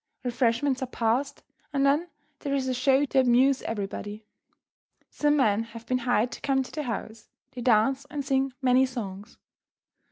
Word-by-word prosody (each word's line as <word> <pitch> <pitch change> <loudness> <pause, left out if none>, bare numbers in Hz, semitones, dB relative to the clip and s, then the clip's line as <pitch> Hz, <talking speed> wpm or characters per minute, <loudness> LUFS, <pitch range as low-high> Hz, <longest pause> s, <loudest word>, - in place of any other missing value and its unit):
Refreshments 250 +2 +1
are 260 - -2
passed, 245 +4 -1 0.3
and 275 -1 +1
then 300 +5 +2 0.3
there 280 -1 -2
is 265 -1 -1
a 260 - 0
"show" 265 +3 +3
to 270 -1 +1
amuse 260 +2 +4
everybody. 205 0 -5 0.9
Some 295 0 +2
men 220 -6 +3
have 230 0 -9
been 255 +1 0
hired 245 -1 +1
to - - -8
come 270 -1 +1
to - - -12
the 305 - -3
house. 225 -3 -6 0.2
They 245 - -7
dance 255 +4 +2
and 290 -3 -4
sing 270 -1 +1
many 255 +1 +4
songs. 210 -3 -7
255 Hz, 165 wpm, -27 LUFS, 230-275 Hz, 0.9 s, amuse